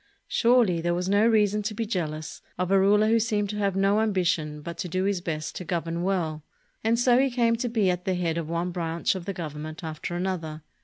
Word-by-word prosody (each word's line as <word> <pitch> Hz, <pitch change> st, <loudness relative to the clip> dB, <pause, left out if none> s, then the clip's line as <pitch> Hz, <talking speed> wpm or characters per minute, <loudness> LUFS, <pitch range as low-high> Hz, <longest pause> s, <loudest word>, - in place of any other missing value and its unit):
Surely, 230 Hz, -8 st, +3 dB
there 175 Hz, +1 st, 0 dB
was 180 Hz, +1 st, -2 dB
no 205 Hz, +3 st, +4 dB
reason 210 Hz, -2 st, +3 dB
to 210 Hz, +1 st, -4 dB
be 225 Hz, -, -2 dB
jealous 155 Hz, -7 st, -4 dB, 0.2 s
of 180 Hz, +1 st, -1 dB
a 195 Hz, -, +5 dB
ruler 210 Hz, +2 st, +4 dB
who 230 Hz, +1 st, +4 dB
seemed 210 Hz, -3 st, 0 dB
to 210 Hz, -, -5 dB
have 200 Hz, -2 st, 0 dB
no 195 Hz, +2 st, +3 dB
ambition 170 Hz, -8 st, 0 dB
but 170 Hz, +2 st, -6 dB
to 180 Hz, -, -4 dB
do 185 Hz, +3 st, -1 dB
his 195 Hz, -2 st, 0 dB
best 155 Hz, -3 st, -4 dB
to -, -, -5 dB
govern 170 Hz, -1 st, -2 dB
well; 170 Hz, -5 st, -1 dB, 0.4 s
and 225 Hz, +1 st, +2 dB
so 245 Hz, +1 st, +4 dB
he 270 Hz, 0 st, +3 dB
came 235 Hz, -2 st, +2 dB
to 240 Hz, +1 st, -2 dB
be 220 Hz, -4 st, +1 dB
at 180 Hz, 0 st, -4 dB
the 190 Hz, -, +1 dB
head 170 Hz, -2 st, -1 dB
of 165 Hz, -2 st, -3 dB
one 170 Hz, +2 st, -1 dB
branch 170 Hz, -1 st, -1 dB
of 185 Hz, -3 st, -6 dB
the 195 Hz, -, -3 dB
Government 155 Hz, -2 st, -6 dB
after 160 Hz, +2 st, -5 dB
another. 170 Hz, -4 st, -3 dB
185 Hz, 235 wpm, -26 LUFS, 170-210 Hz, 0.4 s, a